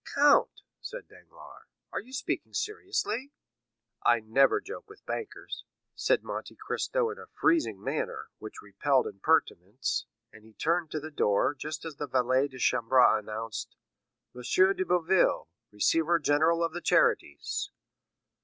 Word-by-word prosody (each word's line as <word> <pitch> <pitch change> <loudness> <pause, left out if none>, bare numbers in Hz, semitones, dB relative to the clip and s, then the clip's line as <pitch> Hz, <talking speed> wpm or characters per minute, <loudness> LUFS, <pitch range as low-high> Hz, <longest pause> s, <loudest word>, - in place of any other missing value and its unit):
"Count," 285 0 +4 0.2
said - - -8
Danglars, - - -16 0.3
"are - - -1
you 245 +5 -13
speaking 265 - -3
seriously?" 370 - -2 0.7
"I 120 -1 +4
never 115 +5 +3
joke 425 +1 -9
with 425 - -16
bankers," 440 - -6 0.3
said - - +1
Monte - - -6
Cristo 485 -3 -1
in 450 - -9
a - - -11
freezing 330 -2 +2
manner, - - -3
which 435 - -9
repelled - - +1
impertinence; 130 - 0 0.3
and 105 - -15
he 110 0 -18
turned 165 +5 0
to 155 - -3
the 155 +1 -8
door, 105 -3 +2
just 155 +3 -6
as 155 -3 -7
the 145 - -4
valet 130 +1 +2
de 130 -2 -12
chambre 125 0 +4
announced: 110 +1 -6 0.6
"M. 125 - -9
de 185 +9 +3
Boville, 180 - +2 0.2
Receiver 165 +11 +2
General 160 +2 +2
of 165 -1 -1
the 175 - -5
charities." 70 - +1
160 Hz, 140 wpm, -29 LUFS, -, 0.7 s, Count